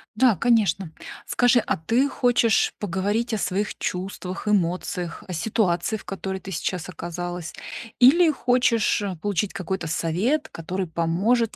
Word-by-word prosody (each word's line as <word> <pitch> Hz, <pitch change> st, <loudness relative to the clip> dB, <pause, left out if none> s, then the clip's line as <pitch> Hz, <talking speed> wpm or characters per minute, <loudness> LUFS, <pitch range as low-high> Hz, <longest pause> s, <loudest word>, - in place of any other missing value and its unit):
Да, 240 Hz, -2 st, +4 dB
конечно. 195 Hz, -5 st, +2 dB, 0.3 s
Скажи, 245 Hz, 0 st, +4 dB
а -, -, -1 dB
ты 235 Hz, -, +1 dB
хочешь 245 Hz, -4 st, +2 dB
поговорить 205 Hz, +5 st, -1 dB
о 220 Hz, -, +1 dB
своих 200 Hz, +2 st, -1 dB
чувствах, 185 Hz, +1 st, -4 dB
эмоциях, 180 Hz, -2 st, -1 dB
о 180 Hz, -, -5 dB
ситуации, 180 Hz, +1 st, 0 dB
в -, -, -14 dB
которой 195 Hz, -1 st, -4 dB
ты 195 Hz, -, -8 dB
сейчас 180 Hz, +1 st, -3 dB
оказалась? 175 Hz, -1 st, -5 dB, 0.5 s
Или 320 Hz, +7 st, +7 dB
хочешь 245 Hz, -5 st, +2 dB, 0.2 s
получить 205 Hz, -1 st, -1 dB
какой-то 190 Hz, -3 st, -3 dB
совет, 205 Hz, -, 0 dB
который 180 Hz, +3 st, -4 dB
поможет 195 Hz, +8 st, +1 dB
195 Hz, 130 wpm, -24 LUFS, 175-230 Hz, 0.5 s, Или